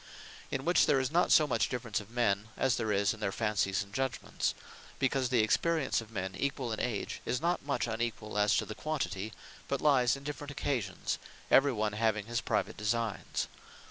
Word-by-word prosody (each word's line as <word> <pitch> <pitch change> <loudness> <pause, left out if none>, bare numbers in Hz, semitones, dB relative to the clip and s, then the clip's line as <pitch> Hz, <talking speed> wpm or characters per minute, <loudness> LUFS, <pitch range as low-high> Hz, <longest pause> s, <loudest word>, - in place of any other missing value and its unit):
In - - -3
which - - +4
there 135 - +4
is 130 0 -1
not 175 +2 +3
so 155 - +7
much 120 -6 +1
difference 120 -3 -2
of 105 -1 -11
Men, 115 -3 +1
as 130 -2 +2
there 110 -2 -1
is 100 0 +2
in 110 - -11
their 100 -2 -1
Fancies 100 -3 0
and 100 0 -17
Judgements; 130 0 -1 0.4
Because 135 -1 +1
the 125 -3 +4
Experience 155 +4 +2
of 110 - -12
men 95 -4 -4
equall 135 -3 -1
in 110 - -2
age, 120 -4 -2
is 125 - -1
not 170 +2 0
much 140 -5 0
unequall, 115 -2 -3
as 105 0 +4
to - - +1
the - - -6
quantity; 110 -9 -3 0.4
but 140 - -1
lyes 135 -5 +4
in 140 - -10
different 145 0 -5
occasions; 125 -9 -2 0.3
every 140 +1 +6
one 105 -3 -1
having 110 -1 +1
his 120 +1 -1
private - - -1
designes. 105 0 -1
115 Hz, 195 wpm, -32 LUFS, 105-135 Hz, 0.4 s, so